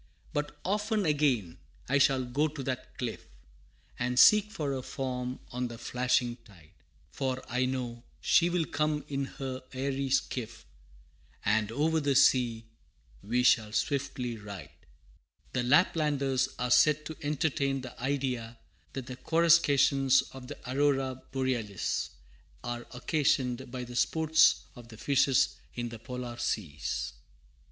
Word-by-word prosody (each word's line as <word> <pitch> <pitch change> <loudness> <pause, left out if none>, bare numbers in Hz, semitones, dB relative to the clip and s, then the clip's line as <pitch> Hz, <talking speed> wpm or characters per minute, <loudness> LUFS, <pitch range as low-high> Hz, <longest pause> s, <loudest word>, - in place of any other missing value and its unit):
But 150 0 -3
often 210 +2 0
again 130 - +1 0.3
I 135 +2 +2
shall 135 -2 +3
go 140 +5 +1
to 145 -2 -7
that 130 -1 -5
cliff, 120 -3 -5 0.7
And 125 0 -1
seek 210 +7 +7
for 150 -9 -2
her 130 - -3
form 125 -2 -4
on 125 0 -2
the 120 -1 -8
flashing 125 0 0
tide, 95 -10 -19 0.4
For 130 -1 -2
I 125 +1 0
know 125 -2 -3 0.2
she 175 0 +4
will 175 -2 0
come 150 0 -1
in 140 -1 -2
her 130 -1 -6
airy 135 +1 -2
skiff, 125 -3 -2 0.8
And 110 0 +2
over 160 +6 +1
the 140 -2 +1
sea 120 -4 +4 0.6
we 120 +4 0
shall 110 -3 +4
swiftly 135 -3 -1
ride! 100 -8 -9
[Footnote - - -32
A: - - -32
The 125 -1 -1
Laplanders 140 -4 +3
are 125 0 -2
said 150 +3 +5
to 160 - -7
entertain 145 -2 0
the 125 -2 -10
idea 125 -4 -2 0.4
that 135 -2 -5
the 125 -1 -7
coruscations 145 -5 +4
of 130 -1 -9
the 145 - -7
Aurora 135 -1 +1
Borealis, 125 -7 -1 0.5
are 120 0 -5
occasioned 130 -1 0
by 125 0 -5
the 120 0 -9
sports 160 +4 +4
of 120 -1 -12
the 110 -2 -12
fishes 135 +2 +2 0.2
in 120 -1 -3
the 115 -1 -9
polar 125 0 -6
seas. 80 -13 -2
130 Hz, 140 wpm, -30 LUFS, 120-145 Hz, 0.8 s, seek